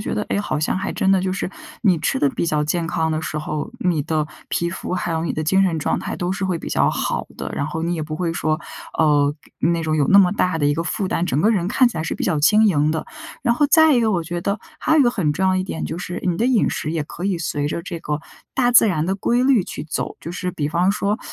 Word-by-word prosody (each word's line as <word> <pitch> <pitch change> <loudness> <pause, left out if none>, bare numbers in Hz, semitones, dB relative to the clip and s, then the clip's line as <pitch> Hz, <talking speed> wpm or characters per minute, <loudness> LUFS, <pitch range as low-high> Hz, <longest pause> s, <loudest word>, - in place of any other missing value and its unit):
觉 - - -3
得， 210 - -1
哎 200 - 0
好 205 - -2
像 155 - 0
还 195 +1 -2
真 190 - +1
的 195 - +4
就 185 - -1
是， 185 - -2 0.3
你 190 -6 +4
吃 - - 0
得 145 - +3
比 - - -2
较 150 -3 +1
健 165 +2 -1
康 160 -1 0
的 155 - -1
时 155 - -3
候， 150 +5 -4
你 175 -7 +1
的 155 +1 -1 0.2
皮 170 - 0
肤 180 - -5
还 175 -2 -2
有 160 +1 -1
你 - - -1
的 155 - -2
精 190 +5 +3
神 170 -4 +1
状 - - 0
态 - - -4
都 180 +1 -2
是 190 0 -3
会 185 -3 -1
比 - - -6
较 - - +2
好 - - -2
的。 - - -5
然 145 - -2
后 160 +1 -4
你 170 +1 0
也 160 - -3
不 155 0 -5
会 175 -2 -1
说， 155 -2 0 0.4
呃， 145 -2 +3 0.3
那 170 +1 +1
种 155 -1 0
有 145 -2 +2
那 200 - +7
么 185 -1 +5
大 180 -5 0
的 145 - +2
一 145 - +2
个 165 - -1
负 190 +3 -2
担， 175 - 0
整 150 -4 0
个 215 - +4
人 185 -5 +1
看 255 +3 +4
起 235 - -9
来 160 - -1
是 165 - -3
比 - - -3
较 160 -5 +1
轻 215 +7 +5
盈 155 -5 +2
的。 160 0 -3 0.4
然 235 - +2
后 295 +3 +3
再 315 0 +6
一 245 - +3
个 225 -2 +2
我 175 -4 0
觉 175 +1 -4
得， 200 +3 -1 0.2
还 310 - +1
有 315 - +5
一 - - +7
个 240 - +4
很 170 -11 0
重 190 +5 0
要 185 - +3
一 185 - +1
点 185 - -4
就 160 - -4
是， 180 0 -5
你 175 -2 +1
的 235 - +1
饮 250 -4 +3
食 155 - -3
也 160 -2 -1
可 175 - -8
以 195 -3 0
随 145 -3 -2
着 170 - -3
这 170 -1 -6
个 150 -2 -3 0.3
大 245 -2 +2
自 230 -2 +7
然 160 -4 0
的 190 - 0
规 240 +5 +1
律 260 -7 +4
去 - - -6
走。 155 - -2 0.2
就 170 - -6
是 180 0 -3
比 150 -4 -2
方 175 +4 +2
说 205 +2 0
175 Hz, 320 characters per minute, -21 LUFS, 155-195 Hz, 0.4 s, 那